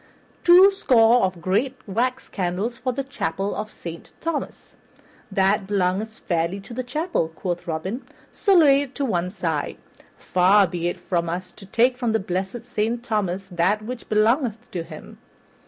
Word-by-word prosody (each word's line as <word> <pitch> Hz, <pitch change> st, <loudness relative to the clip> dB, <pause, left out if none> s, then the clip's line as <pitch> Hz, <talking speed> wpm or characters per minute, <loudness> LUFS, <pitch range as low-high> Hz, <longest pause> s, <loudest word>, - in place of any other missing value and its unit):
"Twoscore 345 Hz, -, +6 dB
of 185 Hz, -3 st, -1 dB
great 230 Hz, +9 st, 0 dB
wax 250 Hz, +6 st, -1 dB
candles 195 Hz, +7 st, -2 dB
for 255 Hz, 0 st, -1 dB
the 275 Hz, +3 st, -3 dB
Chapel 200 Hz, -7 st, -3 dB
of 215 Hz, +1 st, -4 dB
Saint 170 Hz, -5 st, -9 dB
Thomas." 330 Hz, -2 st, -4 dB, 0.6 s
"That 195 Hz, +1 st, +2 dB
belongeth 200 Hz, +2 st, 0 dB
fairly 170 Hz, +2 st, -1 dB
to 195 Hz, -, -11 dB
the 255 Hz, -, -2 dB
chapel," 300 Hz, -, -1 dB
quoth 175 Hz, +2 st, -5 dB
Robin, 185 Hz, +10 st, -4 dB, 0.2 s
"so 395 Hz, -2 st, +2 dB
lay 285 Hz, -5 st, +6 dB
it 275 Hz, -2 st, -7 dB
to 285 Hz, -, -1 dB
one 180 Hz, -7 st, 0 dB
side. 165 Hz, -6 st, -3 dB, 0.4 s
Far 190 Hz, +3 st, +4 dB
be 175 Hz, -2 st, -3 dB
it 175 Hz, -, -2 dB
from 170 Hz, -1 st, -1 dB
us 180 Hz, +2 st, -4 dB
to 195 Hz, -, -14 dB
take 245 Hz, +5 st, +2 dB
from 240 Hz, -3 st, 0 dB
the 220 Hz, -, +2 dB
blessed 190 Hz, +5 st, -4 dB
Saint 235 Hz, 0 st, -2 dB
Thomas 195 Hz, -5 st, -1 dB
that 185 Hz, +4 st, +1 dB
which 245 Hz, +2 st, -7 dB
belongeth 225 Hz, +2 st, +1 dB
to 175 Hz, -, -3 dB
him." 165 Hz, -, -11 dB
210 Hz, 160 wpm, -23 LUFS, 180-250 Hz, 0.6 s, Twoscore